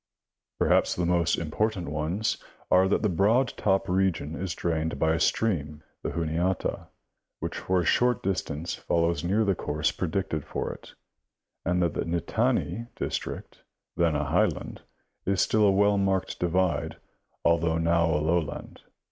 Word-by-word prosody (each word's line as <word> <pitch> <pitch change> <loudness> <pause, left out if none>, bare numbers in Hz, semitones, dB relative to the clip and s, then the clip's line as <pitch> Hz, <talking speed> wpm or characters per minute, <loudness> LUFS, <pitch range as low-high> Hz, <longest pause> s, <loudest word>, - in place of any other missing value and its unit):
Perhaps - - +3
the 90 - 0
most 85 -1 +2
important 90 +4 -1
ones 80 +8 -1 0.3
are 95 +1 +5
that 100 - +1
the - - +4
Broad 105 +8 +3
Top 95 -1 +1
region 90 -5 0
is 90 +1 -4
drained 80 -1 -1
by 80 0 +2
a 80 - 0
stream, 75 -8 0 0.2
the - - -2
Juniata, 85 +2 -1 0.5
which - - -4
for 95 -1 +1
a - - -3
short 125 +3 +2
distance 85 -4 -2
follows 85 0 0
near 100 +5 +2
the 100 - +3
course 75 -3 -1
predicted 85 -3 -2
for - - -3
it; - - -15 0.7
and 90 +1 +1
that 85 - 0
the - - -2
Nittany 110 +6 0
district, - - -4 0.4
then 85 -2 +2
a 75 +1 0
highland, - - 0 0.5
is 95 -1 +1
still 110 -1 +3
a - - +5
well 100 +1 +3
marked 95 -1 0
divide 90 -3 0 0.5
although 85 -1 +3
now 85 +1 +2
a 75 - +2
lowland. 80 +1 -2
85 Hz, 150 wpm, -27 LUFS, 80-95 Hz, 0.7 s, are